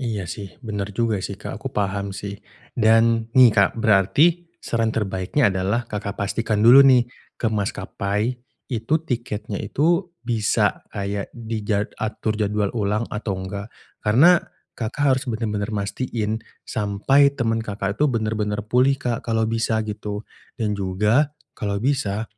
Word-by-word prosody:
Iya 110 Hz, -7 st, -2 dB
sih, 100 Hz, +7 st, -8 dB
bener 105 Hz, -2 st, -3 dB
juga 115 Hz, -4 st, 0 dB
sih, -, -, -5 dB
Kak. -, -, -7 dB
Aku -, -, -4 dB
paham 100 Hz, -1 st, -2 dB
sih. 100 Hz, +1 st, -6 dB, 0.3 s
Dan 115 Hz, 0 st, +3 dB
nih, 125 Hz, -2 st, +9 dB
Kak, 100 Hz, -3 st, +4 dB
berarti 130 Hz, -, +3 dB
saran 115 Hz, -1 st, 0 dB
terbaiknya 100 Hz, +4 st, +1 dB
adalah 100 Hz, +6 st, 0 dB
Kakak 100 Hz, -1 st, -5 dB
pastikan 110 Hz, +1 st, -1 dB
dulu 125 Hz, +4 st, +9 dB
nih 130 Hz, -3 st, +6 dB, 0.3 s
ke 115 Hz, -, -1 dB
maskapai, 105 Hz, +2 st, -2 dB, 0.4 s
itu 115 Hz, +6 st, -1 dB
tiketnya 110 Hz, -6 st, -3 dB
itu 170 Hz, +5 st, +1 dB, 0.2 s
bisa 110 Hz, -3 st, +1 dB
kayak 100 Hz, 0 st, -4 dB
di 115 Hz, -1 st, -4 dB
jad 105 Hz, -1 st, 0 dB
atur 110 Hz, 0 st, -2 dB
jadwal 105 Hz, -1 st, 0 dB
ulang 105 Hz, 0 st, 0 dB
atau 105 Hz, -2 st, -3 dB
enggak, 100 Hz, +3 st, -6 dB, 0.3 s
karena 145 Hz, +12 st, +5 dB, 0.3 s
Kakak 120 Hz, +5 st, -3 dB
harus 135 Hz, -1 st, +2 dB
bener-bener 110 Hz, -2 st, -2 dB
mastiin 110 Hz, +1 st, -2 dB, 0.2 s
sampai 110 Hz, +7 st, +3 dB
temen 115 Hz, -2 st, 0 dB
Kakak 100 Hz, -1 st, -4 dB
itu 150 Hz, -, +4 dB
bener-bener 105 Hz, -3 st, -1 dB
pulih, 125 Hz, +5 st, +3 dB
Kak, 120 Hz, -3 st, -2 dB
kalau 115 Hz, -1 st, +1 dB
bisa, 110 Hz, -1 st, 0 dB
gitu. 105 Hz, 0 st, -5 dB, 0.3 s
Dan 110 Hz, -4 st, -1 dB
juga 105 Hz, +8 st, +2 dB, 0.2 s
kalau 100 Hz, -2 st, -3 dB
bisa 110 Hz, -3 st, 0 dB
110 Hz, 140 wpm, -22 LUFS, 100-120 Hz, 0.4 s, nih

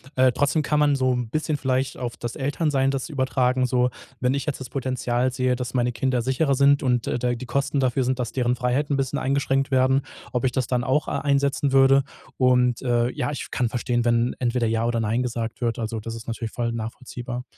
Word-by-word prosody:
Äh, 130 Hz, 0 st, +5 dB
trotzdem 145 Hz, +4 st, +1 dB
kann 150 Hz, 0 st, 0 dB
man 145 Hz, -1 st, +4 dB
so 130 Hz, -1 st, +2 dB
'n 125 Hz, -2 st, -2 dB
bisschen 155 Hz, +3 st, -1 dB
vielleicht 130 Hz, -1 st, -1 dB
auf 120 Hz, -2 st, -4 dB
das 120 Hz, -1 st, -5 dB
Elternsein 140 Hz, -1 st, 0 dB
das 135 Hz, +3 st, -3 dB
übertragen 130 Hz, -2 st, +1 dB
so. 125 Hz, 0 st, +2 dB, 0.3 s
Wenn 125 Hz, +1 st, +1 dB
ich 140 Hz, -1 st, -2 dB
jetzt 150 Hz, -3 st, -3 dB
das 130 Hz, -, -7 dB
Potenzial 130 Hz, -1 st, -1 dB
sehe, 125 Hz, 0 st, 0 dB
dass 125 Hz, 0 st, -5 dB
meine 125 Hz, -1 st, +1 dB
Kinder 125 Hz, 0 st, 0 dB
sicherer 135 Hz, +4 st, +1 dB
sind 140 Hz, +1 st, +4 dB
und, 125 Hz, -3 st, +1 dB
äh, -, -, 0 dB
da 125 Hz, 0 st, 0 dB
die 120 Hz, +1 st, -6 dB
Kosten 140 Hz, +3 st, -1 dB
dafür 130 Hz, 0 st, +1 dB
sind, 130 Hz, +1 st, -1 dB
dass 120 Hz, -3 st, -2 dB
deren 125 Hz, -1 st, +1 dB
Freiheit 125 Hz, +4 st, 0 dB
'n 140 Hz, -, +2 dB
bisschen 135 Hz, -2 st, -1 dB
eingeschränkt 135 Hz, 0 st, 0 dB
werden, 130 Hz, +1 st, +3 dB, 0.3 s
ob 125 Hz, 0 st, -1 dB
ich 130 Hz, -, +2 dB
das 125 Hz, -1 st, -1 dB
dann 125 Hz, -1 st, 0 dB
auch 135 Hz, +4 st, +1 dB
a -, -, -1 dB
einsetzen 140 Hz, 0 st, +1 dB
würde. 135 Hz, 0 st, +5 dB, 0.3 s
Und, 125 Hz, -2 st, +3 dB
äh, 120 Hz, -1 st, +1 dB
ja, 145 Hz, -1 st, -2 dB
ich 145 Hz, -, -5 dB
kann 125 Hz, -, 0 dB
verstehen, 120 Hz, 0 st, -1 dB
wenn 120 Hz, +1 st, +2 dB
entweder 120 Hz, -1 st, 0 dB
ja 115 Hz, +1 st, 0 dB
oder 120 Hz, -1 st, 0 dB
nein 115 Hz, +3 st, 0 dB
gesagt 115 Hz, -2 st, -4 dB
wird. 115 Hz, -1 st, -1 dB
Also, 110 Hz, 0 st, -3 dB
das 115 Hz, +2 st, -6 dB
ist 115 Hz, -, -9 dB
natürlich 115 Hz, -1 st, -4 dB
voll 115 Hz, -1 st, -2 dB
nachvollziehbar. 120 Hz, +2 st, -6 dB
125 Hz, 225 wpm, -24 LUFS, 120-135 Hz, 0.3 s, Äh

